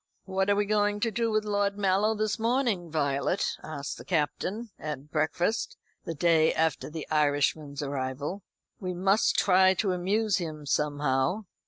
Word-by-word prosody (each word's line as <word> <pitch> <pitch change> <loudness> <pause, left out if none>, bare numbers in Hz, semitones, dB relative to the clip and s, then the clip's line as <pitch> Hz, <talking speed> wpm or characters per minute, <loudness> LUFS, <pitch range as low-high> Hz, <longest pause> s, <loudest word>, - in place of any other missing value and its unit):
"What 190 +1 0
are 200 - +4
we 205 0 +1
going 205 0 +1
to 230 - +1
do 230 +2 0
with 215 -1 0
Lord 205 -1 0
Mallow 205 +2 +2
this 215 +1 -1
morning, 230 -7 0
Violet?" 145 +3 0
asked 145 -3 -6
the - - -9
Captain 190 +7 -2
at 150 -1 -6
breakfast, 170 +8 0 0.3
the 165 - -4
day 160 0 +4
after 160 -2 0
the 155 0 -6
Irishman's 145 -1 +1
arrival. 140 +6 -3 0.4
"We 185 -2 -4
must 195 +4 +2
try 190 0 +5
to 190 +1 0
amuse 195 +3 +1
him 155 -4 -5
somehow." 145 +5 0
180 Hz, 155 wpm, -28 LUFS, 150-205 Hz, 0.4 s, try